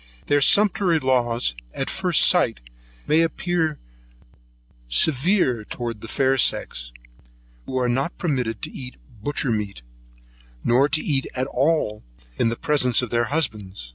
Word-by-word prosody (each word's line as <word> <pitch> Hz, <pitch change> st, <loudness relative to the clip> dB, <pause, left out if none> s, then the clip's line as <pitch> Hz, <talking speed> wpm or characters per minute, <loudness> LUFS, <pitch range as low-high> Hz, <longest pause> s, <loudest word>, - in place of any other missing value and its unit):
Their 145 Hz, 0 st, +2 dB
sumptuary 195 Hz, 0 st, +4 dB
laws, 125 Hz, -, 0 dB, 0.2 s
at -, -, -3 dB
first -, -, +2 dB
sight, -, -, +3 dB, 0.5 s
may 155 Hz, +2 st, +3 dB
appear 165 Hz, -1 st, -1 dB, 1.1 s
severe 130 Hz, -, +2 dB
towards 115 Hz, 0 st, -6 dB
the 115 Hz, -, -9 dB
fair 135 Hz, +3 st, +1 dB
sex, -, -, -1 dB, 0.8 s
who 130 Hz, -, -3 dB
are 125 Hz, -1 st, +1 dB
not 135 Hz, +7 st, -1 dB
permitted 125 Hz, -, -2 dB
to -, -, -4 dB
eat 125 Hz, -1 st, -9 dB, 0.3 s
butchermeat, 110 Hz, -, -2 dB, 0.8 s
nor 130 Hz, +5 st, +3 dB
to 155 Hz, +1 st, 0 dB
eat 135 Hz, -3 st, -1 dB
at 130 Hz, 0 st, -1 dB
all, 135 Hz, -5 st, 0 dB, 0.4 s
in 115 Hz, -, +2 dB
the 115 Hz, -, -2 dB
presence 125 Hz, -3 st, +2 dB
of 125 Hz, -, -5 dB
their 120 Hz, 0 st, +1 dB
husbands. 105 Hz, -, -3 dB
130 Hz, 135 wpm, -22 LUFS, 115-150 Hz, 1.1 s, sumptuary